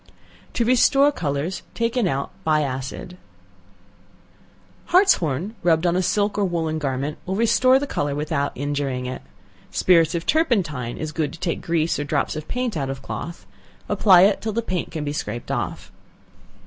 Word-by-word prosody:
To 235 - +1
Restore 275 +4 +4
Colors 155 - -3
taken 230 -2 0
out 140 -4 -2
by 155 -1 +2
Acid, 135 +4 -4
&c. 180 - -14 1.7
Hartshorn 200 - +2
rubbed 165 0 +2
on 175 0 +2
a 185 - +2
silk 205 +2 0
or - - +2
woollen 165 -4 -1
garment 140 +1 -3
will 190 - -3
restore 255 +4 +4
the 280 - -1
color 145 - -2
without 145 -1 -1
injuring 140 -2 -2
it. 130 0 -5 0.5
Spirits 165 -2 +3
of 170 - -3
turpentine 175 - 0
is 155 -1 -4
good 155 -2 -2
to 165 - -11
take 170 -2 -2
grease 165 -1 0
or - - -1
drops 145 +1 -1
of 155 0 -6
paint 250 -4 -2
out 135 -4 -2
of 135 0 -6
cloth; 170 +1 -6 0.4
apply 185 -4 +6
it 200 - +3
till 220 -1 -3
the 230 +2 -1
paint 185 -5 -3
can 155 -2 -4
be 145 0 -3
scraped 120 -4 -4
off. - - -4
165 Hz, 170 wpm, -22 LUFS, 145-205 Hz, 1.7 s, apply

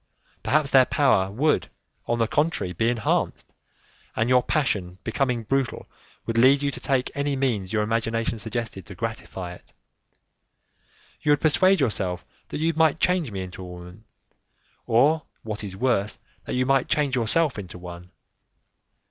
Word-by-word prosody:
Perhaps 150 -1 +1
their 130 -2 +6
power 110 -10 +3
would, 145 +10 +1 0.4
on 120 - +1
the 115 - +2
contrary, 145 - 0
be 115 +7 +1
enhanced, 120 -3 -1 0.6
and 115 +2 +1
your 125 0 +5
passion, 100 -11 -1
becoming 125 0 -1
brutal, 135 +1 -1 0.4
would 115 0 0
lead 135 +4 +5
you 140 - +1
to - - -5
take 130 -2 0
any 140 0 -1
means 115 -9 -1
your 105 -1 +1
imagination 115 +1 -1
suggested 110 -5 -4
to 100 - -9
gratify 95 -4 -5
it. - - -17 1.5
You 150 -1 +4
would 145 - +1
persuade 185 +5 +4
yourself 95 -9 -1 0.2
that - - -5
you 165 +2 +1
might 160 -1 +3
change 180 -8 +1
me 95 -2 -4
into 90 0 -9
a 90 - -7
woman, 90 +4 -11 0.8
or, 145 +8 +4 0.2
what 110 -1 -5
is 95 -2 -7
worse, 110 -4 0 0.3
that - - -3
you 130 0 +1
might 135 0 +2
change 145 -3 +1
yourself 125 +3 +2
into 90 -2 -8
one. 90 0 -10
115 Hz, 155 wpm, -25 LUFS, 100-140 Hz, 1.5 s, their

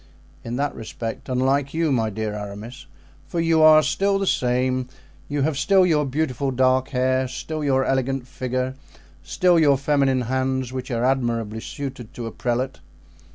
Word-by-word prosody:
"In 115 +1 -4
that 145 +2 -1
respect 115 +1 -6
unlike 135 +3 +1
you, 165 -2 +1
my 115 -4 +1
dear 110 0 -3
Aramis, 105 +6 -8 0.4
for 170 - -3
you 165 -1 +3
are 155 0 +8
still 195 +4 +1
the 195 - -1
same; 125 -3 +1 0.4
you 145 -1 0
have 145 -1 0
still 190 +3 +4
your 155 -4 +2
beautiful 135 -1 -1
dark 130 0 +2
hair, 130 -1 +1
still 155 +4 -5
your 135 -2 +2
elegant 135 -1 -1
figure, 130 0 -3 0.5
still 180 -3 +2
your 145 -3 +4
feminine 140 -2 +2
hands, 130 +1 -1
which 130 0 -5
are 120 -1 0
admirably 115 -4 0
suited 130 -2 -7
to 120 - -5
a 115 - -5
prelate." 125 +3 -2
130 Hz, 160 wpm, -23 LUFS, 125-145 Hz, 0.5 s, are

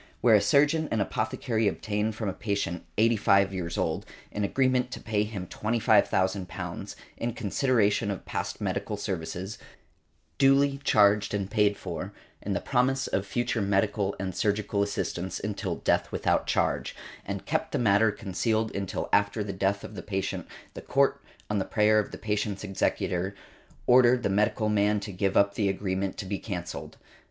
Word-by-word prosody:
Where 120 - +5
a 105 - +6
surgeon 145 +9 +3
and 115 - 0
apothecary 110 +2 -1
obtained 105 +2 -1
from 110 -1 -3
a 95 - -1
patient, 100 -5 -3
eighty 115 +2 +4
five 100 -2 +3
years 85 -3 -3
old, - - -1 0.3
an 105 - -2
agreement 130 +3 +2
to - - -5
pay 105 -2 -1
him 105 -3 -4
£25,000, 95 -3 0 0.2
in 115 0 -2
consideration 110 -2 +1
of 100 -3 -4
past - - -4
medical 105 - -2
services, 95 0 -4 0.8
duly 140 0 +4
charged 105 -3 +4
and 100 -1 -3
paid 105 -2 +3
for, 95 +2 -6 0.3
and 100 -1 -2
the - - +1
promise 135 +1 +1
of 95 +1 -2
future 120 +1 -1
medical 100 0 +1
and 95 -1 -3
surgical 105 +1 0
assistance 95 -2 -2
until 105 0 -3
death - - 0
without - - +1
charge, - - 0 0.3
and - - -5
kept - - -1
the - - 0
matter 110 -1 +4
concealed 110 +3 -1
until 100 -2 -3
after 100 +1 +2
the 100 -1 -4
death 100 +1 0
of - - -8
the - - -6
patient, 95 -2 -3 0.3
the - - -7
Court, - - +2 0.3
on 105 -1 0
the - - +1
prayer 110 +1 +3
of 105 - -2
the - - -8
patient's 105 -2 -2
executor, 95 -1 -1 0.5
ordered 125 0 +5
the - - +1
medical 105 +2 +1
man 105 0 +2
to 105 - -6
give 95 +1 0
up 100 0 +4
the 100 -1 +1
agreement 95 0 -2
to - - -5
be 95 +1 -3
cancelled. 90 -5 -6
105 Hz, 165 wpm, -28 LUFS, 95-110 Hz, 0.8 s, a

